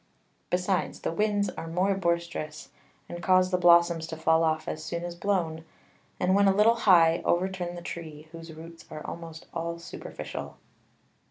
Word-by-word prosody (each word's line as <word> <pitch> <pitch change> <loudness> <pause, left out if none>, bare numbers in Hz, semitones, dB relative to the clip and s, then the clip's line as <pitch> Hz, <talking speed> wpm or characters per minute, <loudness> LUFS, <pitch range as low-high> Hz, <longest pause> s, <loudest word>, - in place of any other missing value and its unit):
Besides, 180 +1 -1
the - - -2
Winds 205 +2 +1
are 165 - -7
more 180 +4 +1
boisterous, 170 -5 -2 0.4
and 175 0 -7
cause 185 0 +3
the 180 - +2
Blossoms 170 -2 +5
to 160 - -6
fall 160 +1 +3
off 155 -1 0
as 155 - -4
soon 170 +1 -4
as 175 0 -4
blown, 170 -4 -1 0.6
and 185 +1 +2
when 200 0 +4
a 195 - +4
little 215 +3 +5
high, 175 -7 +5
overturn 180 0 -1
the 175 - -8
Tree, 155 -3 -8
whose 165 0 -10
Roots 165 +1 -11
are 155 - -8
almost 165 -1 -8
all 170 0 -3
superficial. 70 - -8
170 Hz, 165 wpm, -27 LUFS, 165-185 Hz, 0.6 s, Blossoms